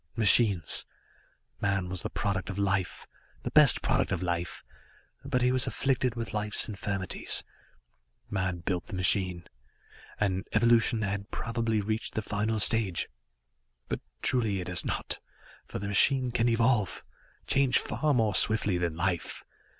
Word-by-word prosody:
Machines 105 -6 +4 0.8
man 95 -2 0
was 90 0 -4
the - - -4
product 100 -2 -2
of 95 - -5
life, 95 -2 -1 0.4
the - - -4
best - - +5
product - - +1
of 90 - -1
life, 85 0 -3 0.6
but 130 -2 0
he 125 - +3
was 130 -1 +3
afflicted 130 -3 0
with 115 -1 -5
life's 105 0 0
infirmities. 100 -2 -3 0.8
Man 95 -3 -2
built 90 0 -3
the 105 - -6
machine 90 -1 +1 0.7
and 95 0 -1
evolution 115 -1 +3
had 100 0 -3
probably 115 -2 -1
reached 110 +2 -3
the 110 - -1
final 105 +2 -1
stage. 105 -5 +2 0.8
But - - -2 0.2
truly, 110 -6 +1
it 90 - -5
has 90 -1 +4
not, - - -4 0.5
for - - -6
the 100 - -5
machine 125 +5 +4
can 120 +1 +1
evolve, 115 -3 +1 0.4
change 135 -2 +3
far 155 -1 0
more 110 -6 +2
swiftly 105 -2 +2
than 85 -2 -2
life. 85 0 -2
105 Hz, 140 wpm, -29 LUFS, 95-115 Hz, 0.8 s, best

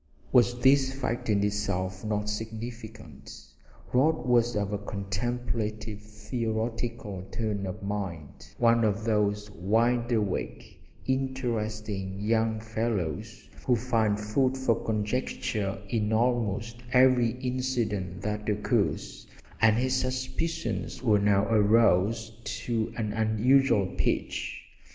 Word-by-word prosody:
Was 120 -1 +4
this 135 +1 +5
fact 125 -4 -3
in 100 -1 +3
itself 100 -2 -1
not 105 -1 -1
significant? 110 - -7 0.5
Rod 145 +4 +3
was 120 -1 +3
of 105 -1 -1
a 100 - -1
contemplative 110 +1 -3
theoretical 110 -1 -3
turn 105 -3 -2
of 100 +3 -6
mind, 95 -7 -5
one 115 -1 +4
of 105 0 +1
those 105 -1 0
wide 115 +6 +1
awake, 105 -5 -2 0.2
interesting 110 -7 -2
young 110 +1 +1
fellows 110 -1 -3 0.2
who 125 - +5
find 110 -3 +1
food 130 +5 +1
for 125 -4 +1
conjecture 105 -2 -1
in 105 0 0
almost 115 -1 0
every 125 -2 +5
incident 120 -8 -2
that 105 0 -2
occurs, 105 0 -1 0.3
and 110 -1 +5
his 130 +1 +1
suspicions 130 +5 -2
were 105 -4 +4
now 100 0 +3
aroused 110 +1 +3 0.2
to 115 -2 -1
an 110 -3 -2
unusual 110 +1 +3
pitch. - - -2
110 Hz, 110 wpm, -28 LUFS, 105-120 Hz, 0.5 s, this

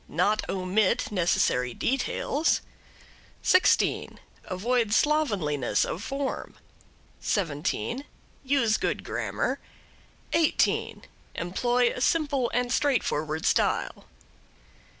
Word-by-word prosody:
Not 205 +6 +1
omit 190 +3 +1
necessary 125 - +1
details. 275 +4 0 0.8
16. 370 - +3 0.3
Avoid 225 +3 0
slovenliness 185 - +1
of 175 - -4
form. 275 +4 -4 0.6
17. 185 - -2 0.4
Use 260 -5 +2
good - - -2
grammar. - - -2 0.7
18. 325 -2 +1 0.3
Employ 240 +8 +1
a - - -6
simple 280 -4 +1
and 245 0 0
straightforward 160 - 0
style. - - +1
225 Hz, 80 wpm, -27 LUFS, 180-270 Hz, 0.8 s, 16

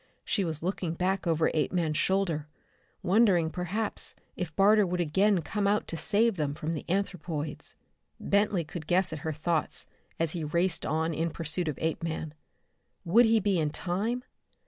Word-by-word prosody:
She 200 - +1
was 160 -3 -3
looking 175 -2 -2
back 185 +1 0
over 160 -1 +2
Apeman's 160 0 0
shoulder, 170 -5 +1 0.6
wondering 185 -5 +4
perhaps 180 +6 -2 0.2
if 170 -5 -5
Barter 210 +2 +6
would 180 -1 -1
again 185 +3 +2
come 205 +5 -1
out 205 +1 +1
to - - -3
save 215 +5 +2
them 145 -2 -1
from 155 +2 -3
the 155 - -4
anthropoids. 175 -5 -3 0.4
Bentley 200 -3 +2
could 160 0 -8
guess 185 -1 +2
at 155 - -4
her 160 +2 -3
thoughts 155 +1 -1 0.3
as 165 -1 +1
he 170 -2 -4
raced 170 +4 0
on 160 +1 0
in 165 +2 0
pursuit 165 +2 -3
of 150 - -2
Apeman. 160 -1 -2 0.7
Would 225 +8 +6
he 225 0 +4
be 200 -3 +1
in 155 -2 +1
time? 200 +10 -2
175 Hz, 165 wpm, -29 LUFS, 160-195 Hz, 0.7 s, Barter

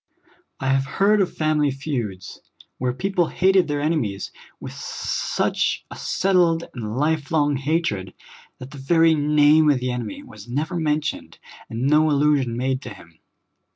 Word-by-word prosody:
I 135 - -2
have 135 0 +1
heard 205 +1 +4
of 185 - 0
family 155 -2 +2
feuds, 125 -9 -5 0.4
where 125 0 0
people 180 +5 0
hated 190 0 +3
their 145 -1 -2
enemies 145 -11 -2 0.3
with - - -8
such - - -2
a - - -7
settled 175 -3 +1
and 110 -2 -5
life 150 0 0
long 145 -3 +2
hatred 135 - -2 0.4
that 130 +1 -10
the 145 - -10
very 165 +4 +4
name 150 +1 +4
of 140 -3 +3
the 125 0 -2
enem}^ 125 - -5
w^as 260 - -13
never 150 +8 -2
mentioned, 155 -1 -2 0.3
and 115 +2 -4
no 150 +3 +4
allusion 140 -5 +2
made 130 +1 -1
to 125 - -8
him. 80 -1 -18
145 Hz, 155 wpm, -22 LUFS, 130-160 Hz, 0.4 s, heard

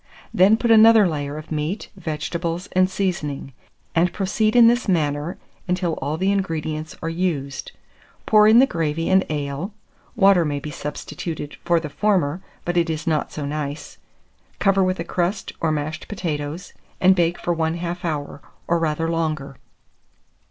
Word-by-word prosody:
Then 195 +4 +5
put 235 0 +1
another 220 -2 +7
layer 145 -2 -3
of 155 +1 -10
meat, 155 +7 -3
vegetables, 170 +1 -3
and 185 0 +3
seasoning; 175 -9 -3 0.4
and 170 +1 +2
proceed 215 +3 0
in 240 -1 +8
this 240 +1 +3
manner 155 -1 0 0.3
until 180 -2 0
all 145 +3 -2
the 190 +3 +1
ingredients 160 -5 -2
are - - -2
used. 165 -6 -2 0.5
Pour 215 -1 +6
in 220 +2 +7
the 260 - +8
gravy 165 - -1
and 190 0 +5
ale 150 +6 -3 0.4
(water 195 -4 +5
may 145 -2 -1
be 150 +2 -7
substituted 150 +1 -6
for 175 -1 +3
the 160 - -5
former, 180 -2 0 0.2
but 175 0 -1
it 170 -1 +2
is 160 +1 -3
not 155 -3 0
so 150 - -5
nice), 145 0 -5 0.6
cover 195 -1 +3
with 185 0 0
a - - -1
crust 185 +3 -2
or 160 - +1
mashed 155 +1 -3
potatoes, 160 -4 -4 0.3
and 185 +1 +5
bake 175 -1 +1
for 175 - -1
1/2 170 +2 -2
hour, 145 -4 -3 0.3
or 170 0 +2
rather 165 0 0
longer. 155 -5 -2
165 Hz, 160 wpm, -22 LUFS, 150-190 Hz, 0.6 s, in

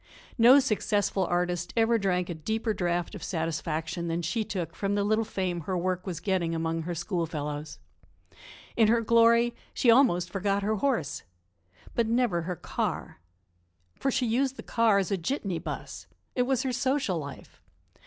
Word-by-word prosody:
No 245 +4 +8
successful 205 -6 0
artist 175 0 -1
ever 225 0 +3
drank 180 -3 0
a 175 - -3
deeper 220 +7 -2
draught 175 -2 -1
of 205 - -8
satisfaction 165 0 -2
than 170 +1 -2
she 220 +7 -1
took 185 -6 -4
from 200 0 -1
the 205 - +1
little 215 +2 +2
fame 185 -4 -2
her 185 +4 -2
work 180 +1 -2
was 175 -4 -3
getting 175 -3 0
among 165 0 -1
her 175 +2 -4
schoolfellows. 150 -4 -3 1.0
In 225 -2 +5
her 230 +1 +3
glory, 230 +1 +4 0.2
she 240 - +5
almost 180 -9 +4
forgot 200 +1 0
her 215 +1 0
horse 205 - -1 0.7
but 235 -2 +1
never 230 -7 +1
her 180 +2 -3
car. 145 - -4 0.7
For 270 - -1
she 255 -1 +1
used 255 +4 +1
the - - -8
car 230 -3 +3
as 195 0 0
a 195 - +1
jitney 185 - -2
bus. - - -7 0.3
It 250 -2 +1
was 265 -2 +1
her 260 -2 -1
social 255 - 0
life. 140 -2 -10
195 Hz, 165 wpm, -28 LUFS, 170-230 Hz, 1.0 s, No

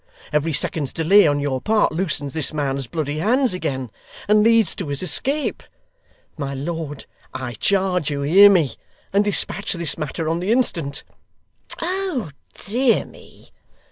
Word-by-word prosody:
Every 150 +2 +1
second's 150 -2 -1
delay 180 +3 +5
on 145 -1 +1
your 135 -3 -2
part 215 0 +2
loosens 155 -5 -2
this 155 0 -1
man's 135 -3 -1
bloody 150 +2 -3
hands 245 - +2
again, 130 - -3 0.4
and 210 +1 +4
leads 225 -3 +4
to 185 - -4
his 140 +3 -1
escape. 275 - 0 0.8
My 140 -2 -4
lord, 150 0 -5 0.3
I 130 -2 -5
charge 185 - 0
you 140 -1 -3
hear 190 +8 +7
me, 170 -9 +2 0.4
and 200 +1 +4
despatch 205 0 0
this 170 -3 -2
matter 155 +1 -3
on 165 +1 0
the 185 +4 -1
instant.' 170 - 0 0.8
'Oh 360 - -2 0.2
dear 240 +3 +1
me! - - -17
165 Hz, 145 wpm, -21 LUFS, 145-205 Hz, 0.8 s, hear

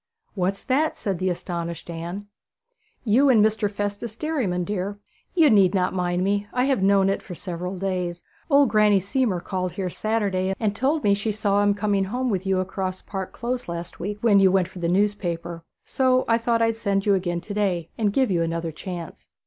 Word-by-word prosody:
'What's 195 +1 -1
that?' 290 +4 +1
said 195 -4 -3
the 185 0 0
astonished 170 -2 -4
Anne. 170 +4 -6 0.8
'You 255 +5 +4
and 220 -5 +6
Mr. 215 -1 +1
Festus 205 +2 -4
Derriman, 250 - -1
dear. 200 +1 -3 0.4
You 330 -4 +6
need 195 -3 +5
not 180 -1 +1
mind 180 -1 0
me; 200 +1 0
I 250 - +1
have 265 -6 +1
known 195 0 +4
it 195 - 0
for 180 - -9
several 180 +1 -5
days. 180 -2 -3 0.3
Old 280 -3 +5
Granny 210 -1 +4
Seamore 200 -2 0
called 185 -2 -3
here 185 -2 -3
Saturday, 195 -4 -1
and 210 -2 0
told 285 +6 0
me 200 - +4
she 205 +2 -1
saw 205 -1 +1
him 205 0 +3
coming 200 -1 +1
home 250 +5 -1
with 190 -1 -2
you 190 -1 +2
across 185 0 -3
Park 190 -2 -5
Close 245 +2 -4
last 170 +1 -6
week, 205 +3 -4
when 210 -4 +5
you 190 -1 +5
went 185 -2 +2
for 185 - -10
the 170 - -1
newspaper; 175 -4 -1 0.2
so 255 -1 +2
I 230 0 +3
thought 230 0 +1
I'd 225 0 +1
send 200 -3 0
you 205 - +4
again 175 -2 0
to 205 - -7
day, 185 -5 -1
and 210 -3 +1
give 260 0 +2
you 170 -2 +2
another 165 0 -2
chance.' 175 +1 -8
200 Hz, 200 wpm, -24 LUFS, 180-215 Hz, 0.8 s, and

